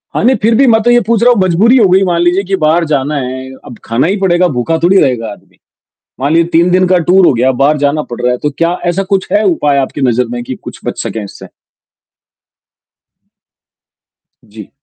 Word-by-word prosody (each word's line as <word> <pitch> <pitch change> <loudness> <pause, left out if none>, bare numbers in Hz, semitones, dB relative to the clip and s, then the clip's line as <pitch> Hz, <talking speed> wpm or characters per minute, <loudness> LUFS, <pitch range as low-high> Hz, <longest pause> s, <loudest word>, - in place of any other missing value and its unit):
हाँ - - -1
नहीं, 255 +3 +3
फिर 225 +2 +2
भी 270 +4 +3
मैं 225 -2 +3
तो 240 - +2
ये 240 - +4
पूछ 230 -2 +1
रहा 245 - +5
हूँ 230 - -2
मजबूरी 185 +7 +2
हो 220 -5 +4
गई 190 +2 +3
मान 175 -2 0
लीजिए 175 +3 +1
कि 195 0 -2
बाहर 165 +2 +2
जाना 145 +1 -1
है, 130 -1 -5
अब 120 - -11
खाना 115 +7 0
ही 195 - 0
पड़ेगा 180 -2 +1
भूखा 125 +7 -1
थोड़ी 185 +3 +3
रहेगा 120 -6 -1
आदमी। 100 - -16 0.6
मान 140 +3 -1
लीजिए 165 +1 +2
3 170 +2 +2
दिन 185 +1 +2
का 185 0 +3
टूर 180 +2 +3
हो - - +4
गया 125 +3 +1
बाहर 150 +2 +2
जाना 145 +2 0
पड़ 120 - -7
रहा 125 0 +1
है, 125 - -3
तो 150 - -2
क्या 170 +1 0
ऐसा 175 +3 0
कुछ 190 - -2
है 210 - +2
उपाय 150 -7 +1
आपकी 135 +2 -3
नजर 125 -1 +1
में 120 0 -5
कि 130 - -6
कुछ - - -10
बच - - -4
सके 110 - -5
इससे? 100 - -12 3.0
जी। 105 -1 -13
165 Hz, 225 wpm, -11 LUFS, 130-190 Hz, 3.0 s, रहा